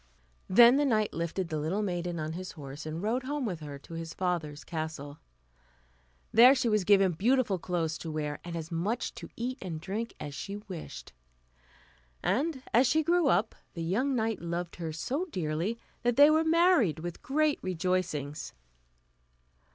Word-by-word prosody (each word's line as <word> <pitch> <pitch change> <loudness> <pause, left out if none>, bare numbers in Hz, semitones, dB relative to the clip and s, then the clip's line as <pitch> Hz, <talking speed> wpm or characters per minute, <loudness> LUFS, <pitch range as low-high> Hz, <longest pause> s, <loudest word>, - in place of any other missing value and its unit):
Then 235 +6 +7
the 290 - +3
knight 215 -5 +1
lifted 170 +2 -2
the 155 -2 -2
little 175 +8 -1
maiden 175 -3 -2
on 155 +1 -3
his 185 +2 -6
horse, 145 0 -8
and 160 +4 -4
rode 235 +5 0
home 290 -1 -2
with 180 -7 -3
her 145 -2 -7
to 140 +4 -13
his 165 0 -6
father's 165 -5 -2
castle. 155 -3 -5 1.1
There 250 +4 +8
she 260 -2 0
was 215 -3 +2
given 195 -1 +5
beautiful 215 +2 +1
clothes 165 -3 -2
to 165 - -6
wear, 150 -1 -3
and 175 -1 -6
as 165 0 -5
much 200 +9 -1
to - - -9
eat 255 +3 -4
and 170 -4 -5
drink 205 +7 -4
as 145 - -6
she 195 +9 -5
wished, 180 - -9 1.1
and 280 -1 0
as 245 +3 +5
she 315 +4 +3
grew 345 0 +3
up 225 -4 +2 0.2
the 165 - -3
young 250 +11 0
knight 225 -2 -1
loved 170 0 -4
her 165 -2 -4
so 270 - -2
dearly 180 - -2 0.2
that 245 -1 +1
they 290 +3 +8
were 315 +1 +4
married 325 - +4
with 175 +1 -6
great 305 +2 +1
rejoicings. 180 -5 -2
185 Hz, 170 wpm, -30 LUFS, 160-240 Hz, 1.1 s, There